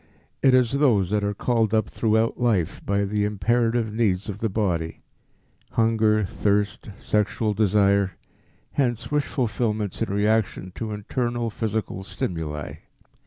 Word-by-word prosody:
It 130 -1 +5
is 125 -3 +3
those 120 -10 +2
that 105 -1 +1
are 100 0 -1
called 115 -1 +1
up 110 -2 +2
throughout 110 0 +1
life 110 -9 0
by 100 0 0
the 105 +1 0
imperative 115 +2 +1
needs 105 -4 0
of 105 0 -5
the 115 - 0
body 90 -6 -2 0.7
hunger, 110 -2 +3
thirst, 100 +3 -1
sexual 105 +1 0
desire 100 -2 +3 0.6
hence 120 -3 -1
wish 150 -1 +1
fulfillments 110 - -2
in 115 - -1
reaction 105 -2 0
to 110 +1 -5
internal 120 +2 -2
physical 110 -3 -3
stimuli. 80 -5 -4
105 Hz, 130 wpm, -24 LUFS, 100-115 Hz, 0.7 s, It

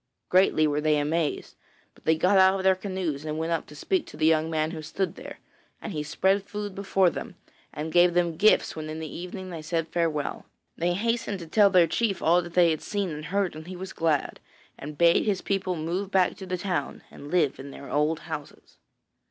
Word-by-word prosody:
Greatly 180 -4 +4
were 150 0 0
they 155 0 +2
amazed, 150 +1 -1 0.4
but - - -24
they 160 0 +3
got 185 +5 +3
out 190 0 +6
of - - -3
their 190 0 +5
canoes 185 -6 -4
and 155 0 -4
went 160 +1 -2
up 165 - -1
to 150 - -13
speak 355 - -1
to - - -11
the 155 - +1
young 160 0 +3
man 155 -1 0
who 160 -2 -6
stood 185 +3 -3
there, - - -10 0.4
and 215 - -6
he 150 - -2
spread 190 +6 +1
food 205 0 -6
before 195 -2 +2
them, - - -7 0.4
and 155 +2 -5
gave 175 +1 +4
them 175 -2 +1
gifts 215 +6 +3
when 155 -1 -6
in 155 +1 -5
the 160 -2 -7
evening 185 +1 -7
they 165 -2 -6
said 165 +1 -2
farewell. 160 -4 -2 0.3
They 175 +1 0
hastened 230 +1 -1
to 170 -3 -9
tell 205 +4 +5
their 180 -3 +5
chief 210 +2 -1
all 170 +2 +3
that 175 -1 -10
they 175 -2 +5
had 155 - -2
seen 200 -4 -2
and 150 0 -6
heard, 195 -3 -1
and 155 +1 -9
he 185 - -7
was 190 +1 -7
glad, 160 -4 0 0.4
and 150 +1 -9
bade 170 +1 +5
his 200 -3 0
people 195 -2 -1
move 175 +5 -3
back 190 -2 +2
to 190 - -8
the 180 0 -2
town 175 -6 -3
and 145 - -11
live 160 -6 +1
in 140 +1 -8
their 140 0 -10
old 150 +2 +1
houses. 155 -4 -9
170 Hz, 225 wpm, -26 LUFS, 155-190 Hz, 0.4 s, out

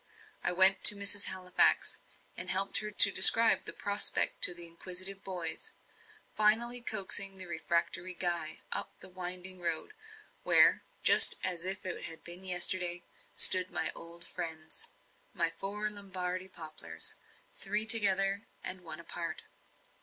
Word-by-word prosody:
I - - -3
went 190 +2 +1
to 210 - +12
Mrs. 200 0 +3
Halifax, 185 -1 0 0.3
and - - -4
helped 195 +1 +3
her 210 - -8
to 205 -1 +8
describe 230 +3 +5
the - - -6
prospect 205 0 -2
to 180 - +8
the 175 0 -5
inquisitive 185 +3 -7
boys; 185 - -6 0.6
finally 235 +3 -1
coaxing 195 -3 -2
the 185 - -4
refractory 170 +1 -5
Guy 170 -3 -5
up - - -3
the 190 - -15
winding 185 0 -9
road, 170 - -3 0.5
where, - - +2 0.2
just - - +8
as 180 -2 -3
if 190 +1 -3
it 185 - -8
had 165 -1 -9
been 175 +2 -8
yesterday, 180 -1 0 0.3
stood 185 -1 +3
my - - -2
old 170 +1 -12
friends, 160 -3 -9 0.5
my 165 - -2
four 200 +5 -8
Lombardy 185 -2 -9
poplars, 155 - -10 0.4
three 210 +2 -2
together 200 -2 +3 0.2
and 185 0 -8
one 165 -2 -10
apart. 170 0 -9
185 Hz, 140 wpm, -27 LUFS, 175-200 Hz, 0.6 s, to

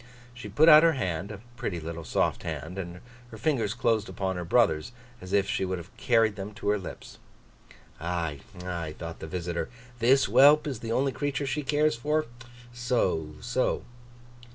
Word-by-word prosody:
She 120 -3 -9
put 150 +11 +4
out 155 -1 +10
her 165 0 +5
hand—a 100 -3 -3 0.2
pretty 90 -6 -3
little 80 +1 -6
soft 75 - 0
hand; 90 +2 -5
and 90 -1 -7 0.3
her 110 - -10
fingers 110 -4 0
closed 115 -4 +1
upon 95 0 -2
her 90 - -3
brother's, 85 0 +2 0.3
as 90 - -9
if 100 -1 +2
she 95 - -1
would 95 0 -1
have 85 +2 -11
carried 115 -3 +2
them 100 +1 -6
to 100 - -2
her 105 0 +2
lips. 95 - -9 0.8
'Ay, 85 -3 -2 0.3
ay?' 85 -4 -4
thought 80 0 -7
the - - -7
visitor. 85 0 -3 0.3
'This 130 +4 +5
whelp 145 +3 +6
is 135 -6 -3
the 115 0 -5
only 135 +3 +1
creature 145 +1 -2
she 135 +3 -1
cares 150 +1 +2
for. 150 +6 0 0.5
So, 105 -11 0
so! 125 +2 0
105 Hz, 175 wpm, -28 LUFS, 90-130 Hz, 0.8 s, out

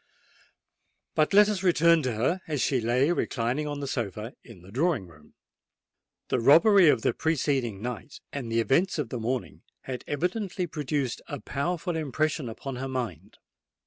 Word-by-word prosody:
But 155 - +2
let 205 +1 +7
us 210 -3 -1
return 170 -3 +4
to 130 -4 -1
her, 130 - 0
as 150 -3 -2
she 125 +1 +1
lay 125 +7 +2
reclining 135 -2 -1
on 145 -1 -4
the 140 - -3
sofa 110 -2 -4
in 105 -8 -14
the 95 - -14
drawing 140 - 0
room. 75 -3 -19 0.9
The 130 - +1
robbery 170 - +6
of 120 -6 +2
the - - +2
preceding 135 -9 -1
night 125 +4 -6
and 125 -5 -4
the 115 0 +2
events 170 - +2
of 145 -7 -2
the 125 - -4
morning 120 +2 -3 0.2
had 130 -2 -6
evidently 180 +5 -2
produced 145 -5 -2
a 145 - -5
powerful 175 +4 -2
impression 155 -2 -1
upon 125 +3 -6
her 135 +1 -4
mind. 110 - -5
140 Hz, 165 wpm, -27 LUFS, 120-160 Hz, 0.9 s, let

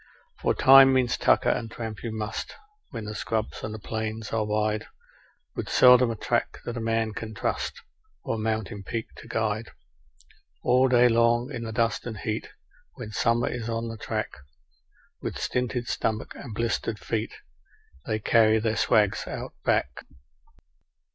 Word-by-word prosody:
For - - +1
time 135 0 +8
means 125 -2 +2
tucker, - - +3
and 115 - -2
tramp 110 -2 -6
you 115 - -4
must, 110 0 -4 0.3
where 115 -6 -6
the 105 0 -5
scrubs 110 0 -3
and 110 0 -5
plains 110 0 -4
are 115 -1 +1
wide, 105 0 -1 0.7
With - - -4
seldom 125 -1 +7
a 115 - -2
track - - -1
that 120 - -4
a - - -3
man 115 -1 0
can 110 0 -6
trust, - - -2 0.4
or - - -2
a 115 - -3
mountain 110 -2 -2
peak 110 +3 -4
to - - -11
guide; 110 0 -1 0.9
All 130 +1 +4
day 125 -1 +5
long 120 +2 +3
in 115 - -4
the 110 - -4
dust 115 0 0
and 110 -3 -5
heat 110 0 -3 0.5
when 110 - -7
summer 115 +2 +1
is 115 -1 -4
on 115 0 -2
the 115 - -5
track 110 0 -3 0.9
With - - -4
stinted 125 -1 -2
stomachs 110 0 -2
and 110 - -8
blistered 115 -1 -1
feet, 110 0 -3 0.7
they 110 - 0
carry 110 0 +4
their 110 0 0
swags 105 -2 +2
Out - - -6
Back. 65 - 0
115 Hz, 160 wpm, -26 LUFS, 110-115 Hz, 0.9 s, time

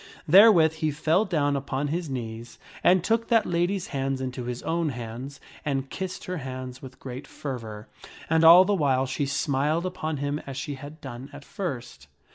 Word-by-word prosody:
Therewith 175 -3 +7
he 155 -1 0
fell 160 +7 +1
down 145 -6 +1
upon 140 +1 -2
his 165 0 -2
knees 115 -2 -6 0.3
and 180 -1 +5
took 225 +3 +1
that 230 -2 +3
lady's 175 +2 -1
hands 135 -1 -2
into 125 -1 -4
hir 125 0 -3
own 165 -1 0
hands, 125 +2 -7 0.2
and 135 -2 -2
kissed 190 -1 -5
her 180 0 -3
hands 130 -2 -7
with 130 -1 -11
great 130 +2 -8
fervor, 115 -6 -7 0.4
and 160 0 +3
all 170 +3 +9
the 205 - +1
while 135 -7 +2
she 135 +2 -2
smiled 145 +5 0
upon 160 -4 -3
him 145 +2 -2
as 135 -1 -6
she 145 - -4
had 145 +3 -10
done 130 +1 -8
at 145 -1 -11
first. 120 - -6
145 Hz, 180 wpm, -26 LUFS, 130-165 Hz, 0.4 s, all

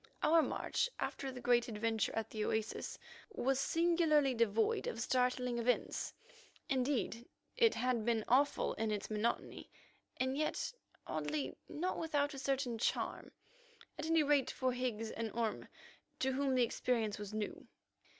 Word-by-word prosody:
Our 325 +1 +6
march, - - 0
after 270 -1 -3
the 250 -1 -8
great 240 -1 +3
adventure 225 0 0
at 225 -1 -2
the 215 -1 -2
oasis, 220 0 -2 0.3
was 270 - +1
singularly 325 -4 +3
devoid 225 -2 +2
of 225 - -3
startling 250 0 +1
events. 245 +1 0 0.6
Indeed, 255 -3 0 0.3
it 465 -2 +4
had 250 -3 +1
been 225 -1 +1
awful 275 +4 +3
in 225 0 -1
its 210 0 -3
monotony, 215 +2 -2 0.5
and 260 +1 0
yet, 305 - -1 0.3
oddly 150 -2 -2
enough, - - -12
not 360 +5 -2
without 295 -3 0
a 275 - -6
certain 265 -4 -1
charm—at 470 - -4
any 325 -1 +4
rate 290 -2 +3
for 255 -1 0
Higgs 235 -3 -2
and 225 -1 -3
Orme, 225 -2 -1 0.5
to 265 - +1
whom 270 0 +1
the 250 - +4
experience 225 -3 0
was 205 -1 -6
new. 215 -1 -4
250 Hz, 145 wpm, -36 LUFS, 225-285 Hz, 0.6 s, Our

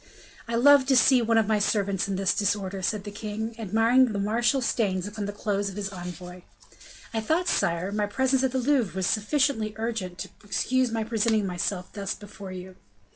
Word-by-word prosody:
"I 230 - -2
love 275 +2 +6
to 270 - +4
see 255 0 +5
one 230 0 +2
of 225 - +4
my 215 0 +1
servants 200 -2 0
in 195 - -2
this 190 0 +1
disorder," 200 -1 -1
said 205 +2 -1
the 205 - -7
king, 215 +2 -5
admiring 225 +5 +3
the 215 -5 -3
martial 230 +6 +1
stains 200 -7 0
upon 205 0 -5
the - - -3
clothes 205 -1 -2
of 190 - -9
his 200 -1 -3
envoy. 180 0 -8 0.7
"I 225 - -1
thought, 325 +10 0
sire, 170 - 0
my 210 0 0
presence 265 +5 +1
at 265 - +1
the 260 - -1
Louvre 255 -6 +1
was 190 -1 -1
sufficiently 220 0 +1
urgent 220 -6 -3
to - - -6
excuse 255 +5 0
my 225 -1 -1
presenting 220 -1 +1
myself 180 0 -3
thus 200 -2 -3
before 200 -2 -10
you." 185 0 -9
210 Hz, 195 wpm, -26 LUFS, 195-235 Hz, 0.7 s, love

